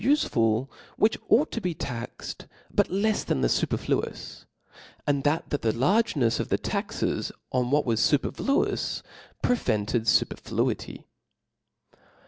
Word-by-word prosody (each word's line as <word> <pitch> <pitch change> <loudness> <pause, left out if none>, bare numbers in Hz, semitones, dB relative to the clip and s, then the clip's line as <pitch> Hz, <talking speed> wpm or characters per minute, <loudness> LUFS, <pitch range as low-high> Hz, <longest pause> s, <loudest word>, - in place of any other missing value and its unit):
ufcful, 120 - +2 0.3
which 215 +1 +3
ought 295 +6 +4
to 230 - -3
be 180 -4 -2
taxed, 120 -4 -6 0.3
but - - +3
left 205 +3 0
than 65 - +1
the - - +3
fuperQuousi - - -1 0.6
and 140 -1 +1
that 150 +3 +1
the 145 - 0
largeneis 140 - +2
of - - -2
the - - +2
taxes - - -2 0.2
on 125 -1 +1
what 145 +2 +2
was 115 -3 +1
fupcrfluoiw, 275 - +1 0.4
prevented 115 - +1
fopcrfluity. 105 - 0
140 Hz, 115 wpm, -27 LUFS, -, 0.6 s, ought